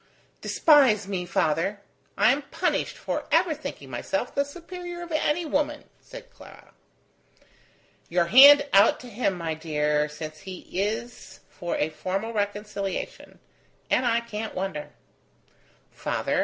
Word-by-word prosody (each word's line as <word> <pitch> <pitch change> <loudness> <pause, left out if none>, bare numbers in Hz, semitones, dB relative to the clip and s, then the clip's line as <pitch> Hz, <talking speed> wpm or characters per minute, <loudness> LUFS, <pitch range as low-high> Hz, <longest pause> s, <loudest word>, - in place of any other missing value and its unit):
"Despise 260 - +4
me, 185 -3 -3
father. 175 +6 0 0.4
I 225 - +5
am 280 +2 0
punished - - -1
for - - -4
ever - - +3
thinking - - -8
myself - - -3
the 280 - +1
superior 350 +3 -8
of 340 - -10
any 310 +2 0
woman," 300 0 -1 0.2
said - - -13
Clara. - - -16 1.4
"Your 175 0 +2
hand 285 +8 +8
out 200 +3 +5
to 250 - -10
him, 210 -3 -1
my 165 -2 -3
dear, 150 -1 0
since 155 +1 -8
he 190 -2 -9
is 220 +5 -4
for 175 -3 -4
a 150 - 0
formal 195 +8 -3
reconciliation; 205 -2 -4 0.5
and 250 - +2
I 235 0 +2
can't 220 -1 -6
wonder." 185 -6 -4 1.0
"Father! - - -2
210 Hz, 130 wpm, -25 LUFS, 180-285 Hz, 1.4 s, hand